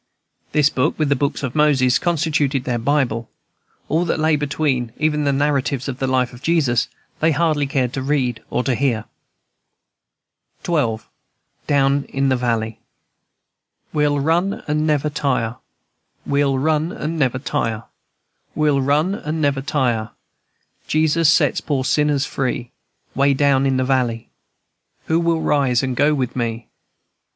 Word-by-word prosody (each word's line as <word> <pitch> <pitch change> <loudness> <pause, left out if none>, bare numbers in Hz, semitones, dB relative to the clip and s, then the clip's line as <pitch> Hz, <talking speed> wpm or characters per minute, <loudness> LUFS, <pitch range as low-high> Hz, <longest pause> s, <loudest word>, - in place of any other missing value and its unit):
This 150 -1 +3
book, 135 +5 0
with 155 -2 0
the 140 - +3
books 140 +2 -2
of 130 -3 -3
Moses, 135 -4 +3
constituted 155 -5 0
their 120 -2 -1
Bible; 120 -3 0 0.6
all 165 +3 +1
that 165 - -1
lay 155 0 +3
between, 140 -4 -1
even 150 -1 0
the 140 - +3
narratives 140 -1 0
of 135 -1 -5
the 135 - -1
life 130 -1 +1
of 125 - -12
Jesus, 140 -9 +1 0.3
they 160 +1 +3
hardly 155 -3 +1
cared 130 -2 -1
to 135 - -3
read 130 -4 -1
or - - -1
to 130 - 0
hear. 120 -4 0 1.6
XII. 120 -10 0 0.7
DOWN 140 -1 +2
IN 135 0 0
THE 130 - +3
VALLEY. 115 -3 -2 1.1
"We'll 150 -1 +2
run 170 +7 0
and 150 +1 0
never 150 -1 +1
tire, 130 -5 -1 0.7
We'll 140 -1 +1
run 155 +4 +1
and 160 -1 -4
never 130 -3 +1
tire, 115 -4 -2 0.7
We'll 150 -2 +2
run 150 +7 +1
and 160 -5 -4
never 140 -3 +1
tire, 125 -6 0 0.8
Jesus 155 0 +3
set - - +2
poor 140 -3 0
sinners 150 -1 +2
free. 130 -3 -3 0.4
Way 140 +1 +3
down 140 -1 +3
in 135 -1 +1
de 130 - +1
valley, 125 -4 0 0.8
Who 160 +1 +1
will 165 -1 +1
rise 135 -5 +2
and 130 -1 -2
go 145 +4 +3
with 130 -3 -2
me? 115 -2 -3
140 Hz, 145 wpm, -20 LUFS, 130-150 Hz, 1.6 s, This